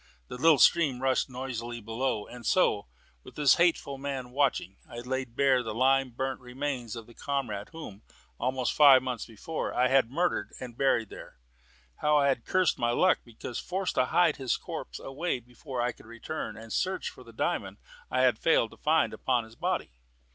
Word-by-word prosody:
The - - -6
little 160 +3 +5
stream 140 -3 +4
rushed 130 +1 +1
noisily 120 -2 -5
below. 115 0 -2
And 125 -1 -11
so, 180 - +2 0.4
with - - -13
this 145 -3 +5
hateful 165 -5 +1
man 135 -3 -4
watching, 130 -8 0
I 120 - -9
laid 130 -1 -4
bare 135 -2 +4
the 110 -3 -5
lime 135 +2 +3
burnt 130 +2 -3
remains 125 -2 -4
of 115 -1 -8
the 120 - -16
comrade 120 -7 -3
whom, 130 -11 -9 0.4
almost 130 -1 0
five 140 -4 +7
months 125 -3 -4
before, 120 +8 -4
I 125 +1 +3
had 135 -4 +4
murdered 170 +7 -1
and 125 -2 -8
buried 120 -5 +1
there. - - -11 0.6
How 150 0 +3
I 140 -1 +4
had 135 - +1
then - - -30
cursed 185 -2 +2
my 120 -1 +1
luck 180 +10 +3
because 120 0 -7
forced 190 +1 -2
to 125 - +2
hide 165 +3 +3
his 130 -3 0
corpse - - -7
away 140 +1 -3
before 120 +1 -6
I 125 - +1
could 110 - -17
return 115 +7 -6
and 110 0 -8
search 190 0 -1
for - - -14
the - - -14
diamond - - -2 0.3
I - - +1
had - - +3
failed - - +3
to - - -15
find - - +2
upon 125 -3 0
his 110 0 -15
body! - - -2
130 Hz, 190 wpm, -29 LUFS, 120-140 Hz, 0.6 s, five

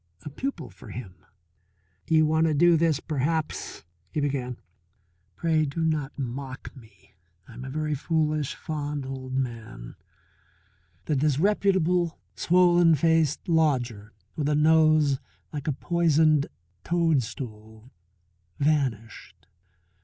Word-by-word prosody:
A 150 - -6
pupil 270 - -5
for - - -14
him! 110 -7 -8 0.9
"You 160 -1 +4
want 160 +1 +2
to 155 - +1
do 170 +3 +5
this 160 -2 +2
perhaps," 155 +2 -2 0.3
he - - -3
began. 135 -4 -2 0.8
"Pray 160 -2 +1
do 155 +3 -2
not 150 -3 -1
mock 135 +1 -6
me; 100 -6 -18 0.3
I 120 - -13
am 125 +3 -9
a 130 - -6
very 155 +2 -2
foolish, 155 -1 -1
fond 145 -2 -4
old 130 -1 -6
man 115 - -5 0.6
" 85 -1 -38
The 150 - 0
disreputable, 175 +3 +2 0.2
swollen 175 -1 +4
faced 160 -1 +1
lodger 125 - +1 0.2
with 150 -2 -1
a 150 - +2
nose 155 -2 +4 0.3
like 145 -1 -5
a - - +2
poisoned 155 -1 +2 0.4
toadstool 125 -8 -2 0.7
vanished. 115 - -2
150 Hz, 115 wpm, -26 LUFS, 125-160 Hz, 0.9 s, do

